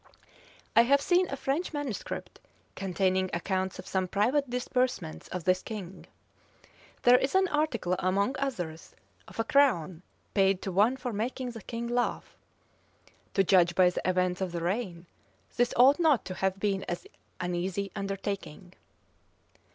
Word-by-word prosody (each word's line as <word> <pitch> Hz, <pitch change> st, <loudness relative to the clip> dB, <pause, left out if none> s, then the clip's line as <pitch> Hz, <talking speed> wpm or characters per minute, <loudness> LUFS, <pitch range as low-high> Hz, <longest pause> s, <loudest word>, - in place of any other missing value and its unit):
I 230 Hz, -, +9 dB
have 275 Hz, +4 st, +4 dB
seen 355 Hz, +5 st, +2 dB
a 275 Hz, -, -2 dB
French 290 Hz, +7 st, -2 dB
manuscript, 290 Hz, -8 st, -5 dB, 0.4 s
containing 185 Hz, 0 st, 0 dB
accounts 190 Hz, +1 st, -2 dB
of -, -, -9 dB
some 190 Hz, -1 st, -1 dB
private 250 Hz, +9 st, +1 dB
disbursements 250 Hz, -8 st, -2 dB
of 180 Hz, -2 st, -5 dB
this 185 Hz, +1 st, +2 dB
king. 195 Hz, -4 st, -8 dB, 1.0 s
There 245 Hz, +1 st, +7 dB
is 275 Hz, -, -1 dB
an 380 Hz, 0 st, +4 dB
article, 275 Hz, -, 0 dB
among 200 Hz, +8 st, +1 dB
others, 175 Hz, -13 st, -4 dB, 0.3 s
of -, -, -12 dB
a -, -, +3 dB
crown 210 Hz, -, +2 dB, 0.3 s
paid 195 Hz, -2 st, +3 dB
to 190 Hz, -, -3 dB
one 210 Hz, +8 st, +3 dB
for 250 Hz, -2 st, -4 dB
making 245 Hz, +4 st, -3 dB
the 225 Hz, -2 st, -9 dB
king 230 Hz, +3 st, -5 dB
laugh. 245 Hz, 0 st, -2 dB, 1.0 s
To 195 Hz, -, +4 dB
judge 175 Hz, -2 st, +4 dB
by 180 Hz, -1 st, +5 dB
the -, -, -3 dB
events 185 Hz, 0 st, 0 dB
of 185 Hz, -2 st, -2 dB
the 170 Hz, -, -3 dB
reign, 180 Hz, -2 st, -2 dB, 0.5 s
this 245 Hz, 0 st, +2 dB
ought 265 Hz, +5 st, +6 dB
not 310 Hz, -7 st, +3 dB
to 185 Hz, -, -5 dB
have 190 Hz, +1 st, -1 dB
been 195 Hz, -1 st, 0 dB, 0.6 s
an 180 Hz, 0 st, -2 dB
easy 190 Hz, +2 st, -2 dB
undertaking. 195 Hz, -3 st, -5 dB
200 Hz, 150 wpm, -29 LUFS, 185-250 Hz, 1.0 s, I